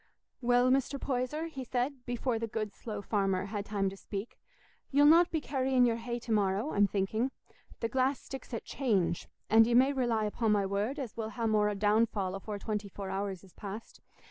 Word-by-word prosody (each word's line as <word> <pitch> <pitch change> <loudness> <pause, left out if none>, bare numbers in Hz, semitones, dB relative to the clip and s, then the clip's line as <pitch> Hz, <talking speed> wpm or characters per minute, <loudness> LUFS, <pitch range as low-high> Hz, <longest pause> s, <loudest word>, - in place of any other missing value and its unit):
"Well, 245 +1 +4
Mr. 275 +1 +1
Poyser," 265 +5 -1
he 275 -5 -6
said, 250 +2 -2
before 245 -1 -1
the 230 - -2
good 215 -2 -3
slow 210 -3 -6
farmer 195 -2 0
had 205 0 -4
time 200 -2 0
to - - -8
speak, 200 +2 -6 0.5
"ye'll 285 +1 +5
not 335 +3 +7
be 320 - 0
carrying 260 -3 +2
your 230 -1 +2
hay 235 +1 -4
to 235 - -6
morrow, 205 +5 +1
I'm 205 0 +4
thinking. 210 +6 0 0.5
The 230 - +1
glass 265 +2 +1
sticks 270 0 -9
at 230 - -4
'change,' 200 - 0 0.2
and 225 +1 +6
ye 235 - +2
may 265 +3 +5
rely 240 -5 +1
upo' 220 +2 0
my 205 -2 +3
word 205 +8 -1
as 260 -6 -5
we'll 220 -1 -3
ha' 230 0 -3
more 210 -1 +2
downfall 205 -2 +2
afore 205 +2 -5
twenty 210 0 -3
four 195 0 -6
hours 195 -1 -3
is 190 - -17
past. 210 +2 -8
225 Hz, 195 wpm, -31 LUFS, 205-255 Hz, 0.5 s, not